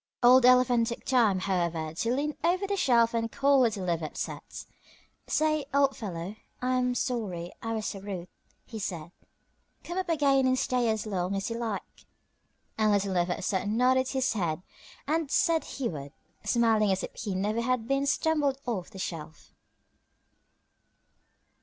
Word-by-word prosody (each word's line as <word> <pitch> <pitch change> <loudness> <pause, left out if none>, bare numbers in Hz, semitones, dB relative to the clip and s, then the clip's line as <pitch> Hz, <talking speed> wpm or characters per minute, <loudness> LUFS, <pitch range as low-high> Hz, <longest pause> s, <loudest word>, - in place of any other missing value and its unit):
Old 250 +1 +7
Elephant 250 -2 +5
took 235 - -5
time, 225 -8 +3
however, 170 -5 -1
to 230 +8 -1
lean 290 +4 -1
over 365 +4 +2
the 400 0 -1
shelf 235 -9 +3
and 230 -1 -1
call 280 0 +3
to - - +5
Little 205 -4 -4
Never 170 -2 -1
upset. 150 - -6 0.6
"Say, 310 -2 +1
old 275 -1 +3
fellow, 190 -1 -6 0.2
I 255 0 0
am 250 0 0
sorry 205 - -2
I 225 0 -3
was 215 -1 -3
so 195 - -4
rude," 190 -3 -6 0.4
he 225 - -7
said. 170 -5 -5 0.7
"Come 350 +2 -3
up 370 -2 -3
again 275 -4 +3
and 255 0 +2
stay 250 -2 +1
as 220 -1 -1
long 190 -2 -2
as 195 +3 -2
you 230 - -3
like." 225 -4 -5 0.7
And 215 -1 +4
Little 200 -1 +1
Never 175 0 +1
upset 190 +2 -2
nodded 250 +4 +3
his 265 -2 0
head 175 -5 -2 0.4
and 315 0 0
said 330 +2 +2
he 265 -3 -3
would, 145 -6 -6 0.3
smiling 225 -4 +3
as 190 - 0
if - - -6
he 200 -4 -4
never 210 +4 0
had 245 -1 0
been 275 +1 +1
tumbled 290 -3 +1
off 215 -8 -3
the 200 - -12
shelf. 160 -4 -7
230 Hz, 165 wpm, -28 LUFS, 190-260 Hz, 0.7 s, Old